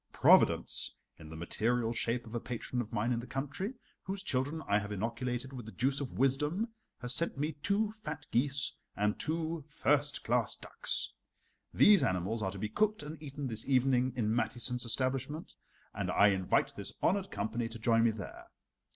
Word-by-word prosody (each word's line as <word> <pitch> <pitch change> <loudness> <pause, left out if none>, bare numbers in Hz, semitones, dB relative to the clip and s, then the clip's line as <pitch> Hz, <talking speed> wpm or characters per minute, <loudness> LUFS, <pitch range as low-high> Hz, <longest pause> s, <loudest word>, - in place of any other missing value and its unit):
Providence, - - +4 0.2
in 80 - -10
the 80 - -8
material 115 +7 0
shape 120 +1 -1
of 110 - -11
a 120 - -1
patron 125 +1 -3
of 110 - -7
mine 115 +4 0
in 120 - +1
the 120 - -7
country, 145 - -3 0.3
whose 195 +1 -5
children 145 +1 -1
I 100 +1 +4
have 105 0 -6
inoculated 120 +5 -3
with 120 -4 -7
the - - -7
juice 135 +4 0
of 135 - -4
wisdom, 150 - +1 0.3
has 125 0 +2
sent 165 +2 +1
me 150 +3 0
two 205 +5 +1
fat 155 -9 -7
geese 135 +3 +2 0.2
and 105 +1 0
two 160 0 -2
first 145 -1 +1
class 120 0 +1
ducks. - - -2 0.6
These 205 -4 +7
animals 95 0 0
are 95 - 0
to 95 - -7
be 105 - -2
cooked 215 - +1
and 155 +1 -8
eaten 145 -1 -5
this 115 0 -2
evening 130 -1 +3
in 110 -3 +1
Mathiesen's 120 +2 -1
establishment, 130 +6 -1 0.4
and - - -2
I 100 - +6
invite 95 -2 +1
this - - -4
honored 195 +1 +2
company 110 +3 -2
to 115 - -8
join 115 0 +3
me 115 - +5
there. 110 -3 -7
125 Hz, 180 wpm, -33 LUFS, 115-150 Hz, 0.6 s, These